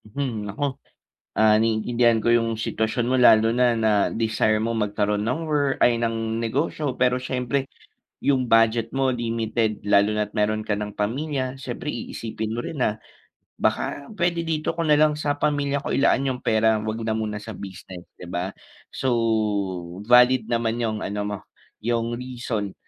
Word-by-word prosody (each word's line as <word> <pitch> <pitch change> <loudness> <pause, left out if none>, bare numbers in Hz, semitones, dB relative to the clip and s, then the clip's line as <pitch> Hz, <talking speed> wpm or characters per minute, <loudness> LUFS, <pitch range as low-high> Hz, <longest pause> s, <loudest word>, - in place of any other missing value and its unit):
Hmm 110 -3 -4
nako! 140 +6 -3 0.5
Ah, 110 -1 +5
naiintindihan 115 +1 +2
ko 120 - +2
yung 115 -1 +2
sitwasyon 110 +1 -1
mo 130 - +3
lalo 115 -2 +6
na 120 0 +3
na 110 -1 +1 0.2
desire 110 -1 +1
mo 115 - -1
magkaroon 105 -1 0
ng 125 +7 -1
wor 145 -2 +2
ay 120 -1 +4
ng 115 -1 -1
negosyo 135 +4 -1
pero 125 0 +2
siyempre, 130 +1 -2 0.5
yung 130 -3 +1
budget 115 0 +3
mo 135 -1 +1
limited 115 -2 -1
lalo 100 0 +4
na 105 0 0
at 105 - -21
meron 110 0 0
ka 105 - +1
ng 105 0 -4
pamilya, 130 +4 -2
siyempre 130 -1 -7
iisipin 110 -2 -5
mo 120 +2 -3
rin 150 - -6
na, 110 -1 0 0.6
baka 140 - -2
pwede 170 -1 +1
dito 160 -2 -2
ko 170 - -2
na 150 -2 +4
lang 155 0 +4
sa 145 -1 -2
pamilya 145 -1 0
ko 140 - -3
ilaan 135 0 +3
yung 130 -2 -2
pera 110 0 +2
huwag 110 +1 -3
na 110 - 0
muna 110 -1 -2
sa 110 +1 -8
business 95 -2 -9 0.2
'di 90 - -9
ba? 90 +2 -3 0.4
So, 130 -2 -1 1.0
valid 125 -1 +5
naman 115 0 0
yung 110 -2 -1
ano 105 +1 -3
mo, 105 0 -3 0.5
yung 120 0 -1
reason 120 -5 -4
115 Hz, 170 wpm, -24 LUFS, 110-130 Hz, 1.0 s, lalo